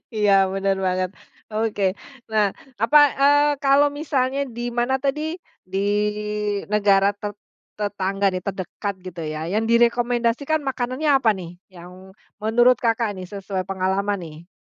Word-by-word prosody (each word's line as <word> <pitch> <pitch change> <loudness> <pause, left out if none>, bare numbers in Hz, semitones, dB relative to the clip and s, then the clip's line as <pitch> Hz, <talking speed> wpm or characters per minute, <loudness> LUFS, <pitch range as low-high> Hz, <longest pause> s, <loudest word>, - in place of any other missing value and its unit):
Iya 210 -2 +3 0.2
bener 195 0 0
banget. 185 -1 0 0.4
Oke, 215 -2 -1 0.5
nah 210 -2 +3 0.3
apa, 235 +7 +5 0.2
eee, 290 +1 +5
kalau 280 +1 +5
misalnya 280 -3 -1 0.2
di 240 0 -3
mana 240 +2 +1
tadi 300 +5 -2 0.4
di 195 - 0 0.9
negara 200 -1 +4
te 205 0 -4 0.5
tetangga 200 -1 -1
nih 185 -1 -3
terdekat 200 +1 -4
gitu 180 -2 -7
ya, 155 0 -4
yang 220 +2 +1
direkomendasikan 240 +5 +2
makanannya 260 +3 -2
apa 250 -5 +4
nih? 175 -1 -9 0.2
Yang 185 +2 -13 0.3
menurut 240 +3 +4
Kakak 230 -2 +1
nih, 185 - -7
sesuai 195 -2 -4
pengalaman 195 +1 -1
nih? 160 +2 -12
210 Hz, 130 wpm, -22 LUFS, 190-250 Hz, 0.9 s, apa